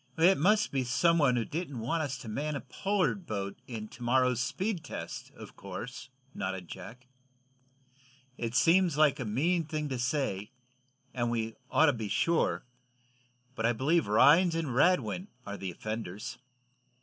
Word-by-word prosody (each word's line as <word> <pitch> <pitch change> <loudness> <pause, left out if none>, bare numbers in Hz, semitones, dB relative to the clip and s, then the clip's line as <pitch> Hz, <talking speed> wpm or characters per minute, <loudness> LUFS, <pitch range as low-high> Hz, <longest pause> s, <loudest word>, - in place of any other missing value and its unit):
"It 175 +2 +5
must 210 +7 +3
be 135 -2 0
some 165 +7 +3
one 135 -5 +4
who 115 -2 0
didn't 155 -4 -4
want 160 +9 -1
us 140 -4 -2
to 125 - -10
man 145 +7 -2
a 140 - -3
Pollard 195 +5 -1
boat 100 -2 -4
in 110 -3 -6
to 120 - -14
morrow's 125 0 +2
speed 185 - -2
test, 150 - -7
of - - -11
course," 110 +7 -7 0.2
nodded 95 -2 -4
Jack. 115 +10 -10 1.3
"It 115 -1 -4
seems 170 0 +4
like 150 -2 +4
a 125 - -3
mean 165 +11 +1
thing 155 -1 -3
to 130 -2 -3
say, 125 -6 -1 0.6
and 120 -2 0
we 115 -1 -1 0.2
ought 160 - +5
to 145 - +4
be 110 -3 -4
sure, 165 +1 +1 0.9
but 115 -2 0
I 120 - +2
believe 145 +6 +2
Rhinds 155 - +5
and 160 -6 -2
Radwin 180 +6 +2 0.2
are 100 - -5
the 95 -2 -5
offenders." 105 +1 -5
130 Hz, 160 wpm, -30 LUFS, 115-165 Hz, 1.3 s, It